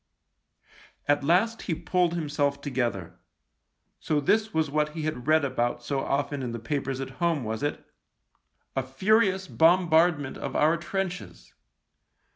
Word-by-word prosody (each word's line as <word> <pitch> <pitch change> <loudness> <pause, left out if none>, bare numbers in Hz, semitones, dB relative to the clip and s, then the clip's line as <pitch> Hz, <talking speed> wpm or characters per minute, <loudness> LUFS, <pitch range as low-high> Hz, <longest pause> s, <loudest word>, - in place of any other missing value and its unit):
At 145 0 +2
last 195 +9 +2
he 165 - +1
pulled 175 +1 0
himself 145 -3 -1
together. 120 - -3 0.8
So 150 - 0
this 215 +9 +1
was 160 -5 0
what 150 0 0
he 160 - -4
had 150 -4 -4
read 155 -1 +4
about 120 -2 -1
so 140 +2 -1
often 140 +1 -1
in 120 -2 -4
the 115 - -4
papers 135 +2 -3
at 135 -1 -5
home, 165 -5 +1
was 110 0 -4
it? 145 - -3 0.5
— - - -46
"a 135 - +1
furious 190 - +1
bombard 170 0 +4
ment 140 -2 -7
of - - -5
our 155 +2 +4
trenches." 180 +1 -5
150 Hz, 150 wpm, -27 LUFS, 135-170 Hz, 0.8 s, read